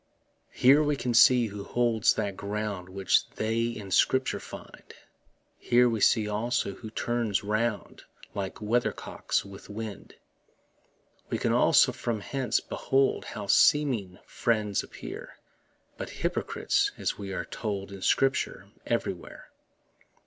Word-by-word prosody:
Here 135 Hz, +4 st, +6 dB
we 150 Hz, -1 st, +1 dB
can 125 Hz, -3 st, -2 dB
see 125 Hz, +1 st, +6 dB
who 105 Hz, -2 st, -6 dB
holds 115 Hz, -1 st, +2 dB
that 100 Hz, -2 st, -2 dB
ground 100 Hz, -2 st, -4 dB
Which 95 Hz, 0 st, +1 dB
they 115 Hz, +1 st, 0 dB
in 105 Hz, -4 st, -5 dB
Scripture 130 Hz, +7 st, +2 dB
find: -, -, -12 dB, 0.6 s
Here 125 Hz, +1 st, +4 dB
we 115 Hz, -3 st, -1 dB
see 110 Hz, 0 st, +4 dB
also 110 Hz, 0 st, -1 dB
who 110 Hz, -, -9 dB
turns 115 Hz, -2 st, -1 dB
round 110 Hz, +1 st, -2 dB, 0.3 s
Like 95 Hz, -2 st, -4 dB
weathercocks 115 Hz, -2 st, -1 dB
with 100 Hz, 0 st, -12 dB
wind. 105 Hz, 0 st, -7 dB, 1.1 s
We -, -, -1 dB
can -, -, 0 dB
also -, -, +5 dB
from 115 Hz, -3 st, -3 dB
hence 130 Hz, +4 st, -1 dB
behold 135 Hz, 0 st, 0 dB
How 105 Hz, -2 st, -6 dB
seeming 120 Hz, -, +3 dB
friends 105 Hz, -4 st, 0 dB
appear -, -, -9 dB, 0.6 s
But -, -, -5 dB
hypocrites, -, -, -1 dB
as -, -, -2 dB
we 100 Hz, -1 st, -6 dB
are -, -, -3 dB
told 100 Hz, -3 st, -4 dB
In 100 Hz, -1 st, -9 dB
Scripture 135 Hz, +7 st, +1 dB, 0.2 s
everywhere. -, -, -4 dB
110 Hz, 125 wpm, -28 LUFS, 100-120 Hz, 1.1 s, Here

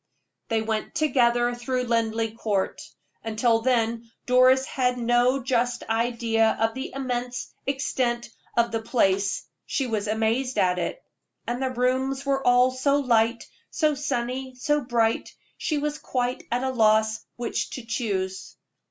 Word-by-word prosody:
They 225 Hz, -1 st, 0 dB
went 220 Hz, -1 st, -3 dB
together 240 Hz, -5 st, +2 dB
through 250 Hz, +1 st, -2 dB
Linleigh 225 Hz, -2 st, 0 dB
Court. 205 Hz, -4 st, -1 dB, 0.4 s
Until 225 Hz, +1 st, +2 dB
then 230 Hz, -2 st, 0 dB, 0.2 s
Doris 255 Hz, +1 st, +5 dB
had 250 Hz, -2 st, 0 dB
no 245 Hz, +2 st, +2 dB
just 245 Hz, -1 st, 0 dB
idea 225 Hz, -1 st, +1 dB
of 225 Hz, 0 st, +1 dB
the 265 Hz, +1 st, -5 dB
immense 250 Hz, -2 st, -3 dB
extent 255 Hz, -3 st, -1 dB, 0.3 s
of 235 Hz, 0 st, +3 dB
the 225 Hz, -1 st, -1 dB
place 195 Hz, -4 st, +1 dB, 0.2 s
she 270 Hz, -, 0 dB
was 220 Hz, -3 st, -2 dB
amazed 225 Hz, +4 st, 0 dB
at 180 Hz, -1 st, +2 dB
it. -, -, -4 dB, 0.4 s
And 245 Hz, +2 st, -3 dB
the 260 Hz, -, 0 dB
rooms 260 Hz, +2 st, 0 dB
were 275 Hz, -1 st, 0 dB
all 250 Hz, +1 st, +5 dB
so 260 Hz, +2 st, +1 dB
light, 230 Hz, -4 st, +2 dB, 0.3 s
so 305 Hz, -3 st, +1 dB
sunny, 260 Hz, -2 st, -3 dB
so 295 Hz, +4 st, +1 dB
bright, 235 Hz, -3 st, 0 dB, 0.2 s
she 305 Hz, -, -1 dB
was 295 Hz, +1 st, -2 dB
quite 250 Hz, -1 st, -2 dB
at 245 Hz, +2 st, 0 dB
a 265 Hz, -, 0 dB
loss 220 Hz, -2 st, +3 dB
which 240 Hz, -1 st, -2 dB
to 255 Hz, -, -7 dB
choose. 195 Hz, -5 st, -3 dB
240 Hz, 145 wpm, -25 LUFS, 225-260 Hz, 0.4 s, Doris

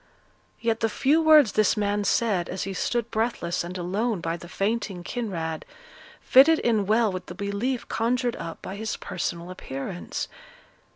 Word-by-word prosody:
Yet 230 Hz, -1 st, 0 dB
the 225 Hz, -, +1 dB
few 285 Hz, +8 st, +2 dB
words 305 Hz, -7 st, +7 dB
this 215 Hz, +1 st, +2 dB
man 205 Hz, 0 st, 0 dB
said, 195 Hz, -4 st, +1 dB
as 185 Hz, -, -3 dB
he 195 Hz, -, -4 dB
stood 235 Hz, +4 st, -1 dB
breathless 220 Hz, -7 st, -1 dB
and 180 Hz, +2 st, -6 dB
alone 200 Hz, +5 st, -1 dB
by 165 Hz, 0 st, -2 dB
the 175 Hz, 0 st, -10 dB
fainting 195 Hz, -2 st, -2 dB
Kinraid, 170 Hz, -9 st, -3 dB, 0.6 s
fitted 285 Hz, +5 st, +6 dB
in 220 Hz, -7 st, +1 dB
well 220 Hz, 0 st, +3 dB
with 185 Hz, -1 st, -6 dB
the -, -, -8 dB
belief 210 Hz, +5 st, -2 dB
conjured 240 Hz, +1 st, 0 dB
up 165 Hz, -, -7 dB
by 195 Hz, -, -6 dB
his 220 Hz, +1 st, -3 dB
personal 170 Hz, +1 st, -4 dB
appearance. 175 Hz, +1 st, -5 dB
210 Hz, 160 wpm, -26 LUFS, 180-235 Hz, 0.6 s, words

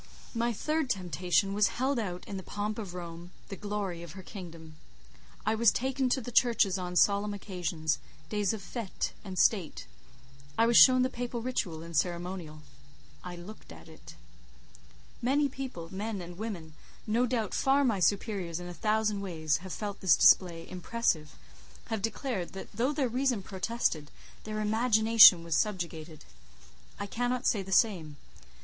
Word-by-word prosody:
My 235 Hz, 0 st, 0 dB
third 305 Hz, +5 st, -1 dB
temptation 180 Hz, -, 0 dB
was 205 Hz, 0 st, +4 dB
held 260 Hz, +1 st, +1 dB
out 180 Hz, -5 st, -5 dB
in 200 Hz, -, -6 dB
the 190 Hz, -, -4 dB
pomp 210 Hz, +3 st, -4 dB
of 190 Hz, -5 st, -6 dB
Rome—the 175 Hz, +2 st, -9 dB
glory 200 Hz, -3 st, -4 dB
of 170 Hz, -2 st, -9 dB
her 190 Hz, 0 st, -10 dB
kingdom. 165 Hz, -6 st, -10 dB, 0.7 s
I 220 Hz, -, +2 dB
was 225 Hz, 0 st, +5 dB
taken 260 Hz, +1 st, -1 dB
to 260 Hz, -, +1 dB
the 245 Hz, -, -7 dB
churches 225 Hz, -6 st, +3 dB
on 180 Hz, -1 st, -5 dB
solemn 205 Hz, +2 st, +3 dB
occasions—days 180 Hz, +2 st, -3 dB
of 215 Hz, -3 st, -5 dB
fête 220 Hz, 0 st, -4 dB
and 190 Hz, -3 st, -7 dB
state; 180 Hz, -, +1 dB, 0.7 s
I 225 Hz, -, +5 dB
was 235 Hz, 0 st, +2 dB
shown 255 Hz, 0 st, +8 dB
the 255 Hz, -, +1 dB
Papal 240 Hz, -1 st, -4 dB
ritual 175 Hz, -10 st, -2 dB
and 170 Hz, 0 st, -8 dB
ceremonial. 175 Hz, -2 st, -2 dB, 0.6 s
I 180 Hz, 0 st, -7 dB
looked 180 Hz, +5 st, -11 dB
at -, -, -13 dB
it. 160 Hz, -1 st, -13 dB, 1.1 s
Many 280 Hz, +4 st, +2 dB
people—men 215 Hz, -6 st, -5 dB
and 175 Hz, 0 st, -8 dB
women—no 215 Hz, +4 st, -4 dB
doubt 225 Hz, -4 st, -1 dB
far 275 Hz, +1 st, +3 dB
my 230 Hz, -7 st, +1 dB
superiors 185 Hz, -2 st, 0 dB
in 175 Hz, -, -7 dB
a 175 Hz, -, -7 dB
thousand 215 Hz, +1 st, 0 dB
ways, 160 Hz, -5 st, -1 dB
have 185 Hz, +2 st, -9 dB
felt 205 Hz, +1 st, -5 dB
this 185 Hz, -5 st, +4 dB
display 170 Hz, -3 st, +4 dB
impressive, 180 Hz, -5 st, -2 dB, 0.6 s
have 220 Hz, -2 st, -1 dB
declared 225 Hz, -4 st, -3 dB
that 195 Hz, -, -8 dB
though 240 Hz, +7 st, 0 dB
their 285 Hz, -3 st, 0 dB
Reason 245 Hz, -3 st, 0 dB
protested, 190 Hz, -6 st, -2 dB, 0.4 s
their 215 Hz, 0 st, -3 dB
Imagination 220 Hz, -4 st, +6 dB
was 165 Hz, -2 st, -1 dB
subjugated. 170 Hz, -6 st, -3 dB, 0.7 s
I -, -, -3 dB
cannot 245 Hz, +4 st, -2 dB
say 205 Hz, -, +2 dB
the 190 Hz, 0 st, -9 dB
same. 175 Hz, -8 st, +2 dB
200 Hz, 155 wpm, -30 LUFS, 175-230 Hz, 1.1 s, shown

